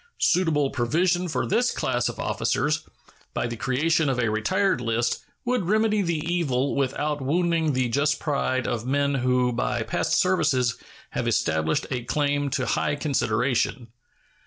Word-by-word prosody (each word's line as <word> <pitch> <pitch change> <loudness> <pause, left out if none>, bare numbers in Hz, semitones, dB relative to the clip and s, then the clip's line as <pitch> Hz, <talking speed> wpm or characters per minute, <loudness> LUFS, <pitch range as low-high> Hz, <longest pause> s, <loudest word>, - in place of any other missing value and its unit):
Suitable 155 -6 +2
provision 175 +9 +1
for 160 - -1
this 240 +5 +2
class 125 -2 -1
of - - -7
officers, - - -1 0.5
by - - 0
the 120 0 -3
creation 145 +7 +1
of 130 - 0
a 115 -3 +1
retired 185 - +1
list, 120 0 -1 0.2
would 245 -7 0
remedy 215 0 +2
the 165 -4 -1
evil 140 -6 0
without 145 +2 -1
wounding 165 +2 +1
the 130 -1 +1
just 145 +5 +1
pride 130 -4 -1
of 120 -2 -2
men 140 +2 +1
who 125 -1 +1
by 120 - -1
past - - -1
services 125 -2 +2 0.4
have - - -2
established 80 0 +1
a 125 -2 -2
claim 145 +1 0
to 135 -1 -1
high 145 +3 0
consideration. 125 -3 0
140 Hz, 150 wpm, -25 LUFS, 125-165 Hz, 0.5 s, Suitable